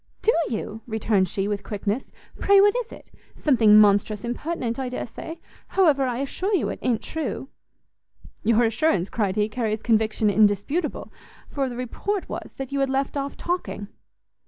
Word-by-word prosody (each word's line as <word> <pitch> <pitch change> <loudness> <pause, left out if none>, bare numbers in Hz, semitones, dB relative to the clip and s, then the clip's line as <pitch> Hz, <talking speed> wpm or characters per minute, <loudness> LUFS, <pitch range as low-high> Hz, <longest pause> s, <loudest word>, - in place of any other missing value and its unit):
"Do 455 - +4 0.2
you?" 220 0 -4
returned 215 -4 +1
she, 195 +3 -2
with 205 -1 -2
quickness, 210 +4 -3 0.3
"pray 400 0 +5
what 410 +2 +5
is - - -3
it? - - -13 0.2
something 225 -7 +5
monstrous 205 0 +3
impertinent, 245 -1 -3
I 260 -1 -2
dare 250 - -4
say, 320 +7 -8 0.4
however, 300 -8 +4
I 245 -1 -2
assure 375 +9 -1
you 360 - 0
it - - -5
i'n't 235 -3 0
true." 295 -3 -4 0.9
"Your 230 +2 +4
assurance," 225 - +1
cried 200 -4 0
he, 210 -1 +2
"carries 220 -1 -2
conviction 220 -2 +2
indisputable, 215 - +1 0.4
for 275 -2 -1
the 245 - -6
report 370 - -3
was - - -7
that 270 -1 -6
you 280 - -1
had 275 -1 +1
left 270 +1 -1
off 280 0 -3
talking." 345 - -3
240 Hz, 165 wpm, -24 LUFS, 215-290 Hz, 0.9 s, pray